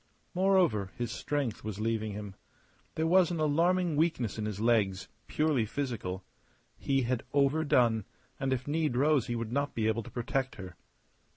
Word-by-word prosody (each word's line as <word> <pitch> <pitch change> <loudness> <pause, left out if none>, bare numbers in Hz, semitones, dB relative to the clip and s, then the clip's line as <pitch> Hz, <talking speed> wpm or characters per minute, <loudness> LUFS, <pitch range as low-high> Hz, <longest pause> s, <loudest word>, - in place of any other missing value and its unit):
Moreover, 180 - +3
his 120 -1 -3
strength 135 -5 -2
was 105 -2 -5
leaving 110 -1 -1
him. 105 -1 -6 0.6
There 160 - 0
was 180 +1 +5
an 170 -2 -2
alarming 165 +3 +2
weakness 145 - 0
in 105 - -2
his 105 -2 -4
legs, 105 -5 +1 0.2
purely 150 -6 +1
physical. 105 -9 -4 0.5
He 135 -1 0
had 120 0 -1
overdone, 140 -6 +3 0.3
and 135 -2 -1
if 130 0 -1
need 150 -4 0
rose 145 -2 +3
he 120 - -2
would 115 -1 -4
not 140 +2 -1
be 110 - 0
able 110 +1 +1
to 120 - -10
protect 130 +2 -2
her. 95 -3 -9
125 Hz, 165 wpm, -30 LUFS, 110-150 Hz, 0.6 s, was